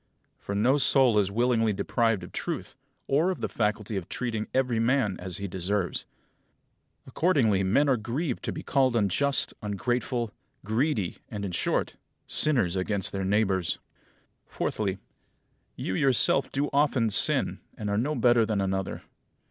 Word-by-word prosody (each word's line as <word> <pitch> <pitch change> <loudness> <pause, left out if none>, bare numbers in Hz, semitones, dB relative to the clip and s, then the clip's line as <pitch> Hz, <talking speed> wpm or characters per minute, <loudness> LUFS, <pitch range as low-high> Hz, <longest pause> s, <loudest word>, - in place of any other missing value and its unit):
For 100 - -5
no 125 +8 +3
soul 130 -6 +4
is 100 -2 +1
willingly 115 0 +2
deprived 115 -1 0
of 85 - -9
truth, - - -4 0.3
or 155 +6 +2
of 185 - -2
the - - -2
faculty 105 -1 -2
of 90 - -6
treating 115 -3 -3
every 125 -3 +1
man 115 -4 +2
as 90 -1 -3
he 100 - -4
deserves. 95 0 -2 1.0
Accordingly 125 - +2
men 115 +10 +3
are 135 -3 +3
grieved 125 +5 -3
to - - -1
be - - -6
called 130 -3 +2
unjust, 115 +7 +1
ungrateful, 120 +2 -2 0.3
greedy, 110 - 0
and, 100 -2 -4
in 95 - -4
short, 85 - -1 0.3
sinners 120 - +1
against 95 +1 0
their 95 -1 -3
neighbours. 95 -3 +1 0.7
Fourthly: 100 -3 -2 0.8
You 95 - -3
yourself 135 +4 +3
do 145 +1 -1
often 135 -6 +2
sin, - - +2 0.2
and 105 - -4
are 100 0 0
no 145 +6 -1
better 120 -3 +4
than 110 -2 -1
another. 95 -1 -2
110 Hz, 150 wpm, -27 LUFS, 100-130 Hz, 1.0 s, soul